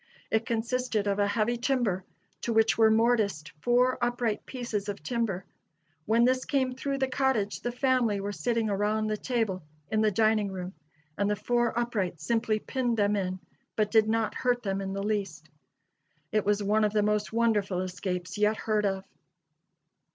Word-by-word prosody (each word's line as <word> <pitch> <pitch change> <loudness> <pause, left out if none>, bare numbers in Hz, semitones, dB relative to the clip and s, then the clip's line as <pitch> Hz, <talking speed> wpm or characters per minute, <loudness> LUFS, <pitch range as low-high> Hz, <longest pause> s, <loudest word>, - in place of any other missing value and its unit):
It 220 +1 +1
consisted 235 -2 -1
of 200 0 0
a 205 - +3
heavy 220 +3 0
timber, 235 -7 0 0.4
to 235 - -2
which 225 0 +4
were 220 -1 +5
mortised 220 -8 +2
four 245 +5 +2
upright 240 -3 -1
pieces 225 -5 -3
of 195 -7 -5
timber. 210 -3 -2 0.6
When 230 +2 +4
this 255 0 +2
came 260 -3 0
through 275 +2 -3
the 265 -1 +1
cottage 260 -6 0
the 240 - -2
family 245 -5 +1
were 200 +1 -3
sitting 220 +6 -1
around 210 +2 0
the 215 0 0
table 220 -6 -1 0.3
in 220 0 +2
the 215 - +4
dining 215 0 +2
room, 185 0 -6 0.5
and 200 0 +2
the 210 - +1
four 240 +2 0
uprights 195 -9 -2
simply 225 -2 +1
pinned 240 +1 -1
them 205 0 +2
in 185 -2 -2 0.4
but 210 -1 +1
did 220 -1 +4
not 225 0 +1
hurt 245 -1 0
them 195 -1 -1
in 195 0 -4
the 195 0 -3
least. 205 -1 -2 0.8
It 215 -1 +1
was 205 0 +2
one 215 +2 +2
of 210 0 +1
the 210 -1 +3
most 210 0 0
wonderful 210 -5 +1
escapes 180 +1 -4
yet 210 +1 +3
heard 215 -2 +1
of." 195 -1 -2
215 Hz, 175 wpm, -28 LUFS, 200-240 Hz, 0.8 s, were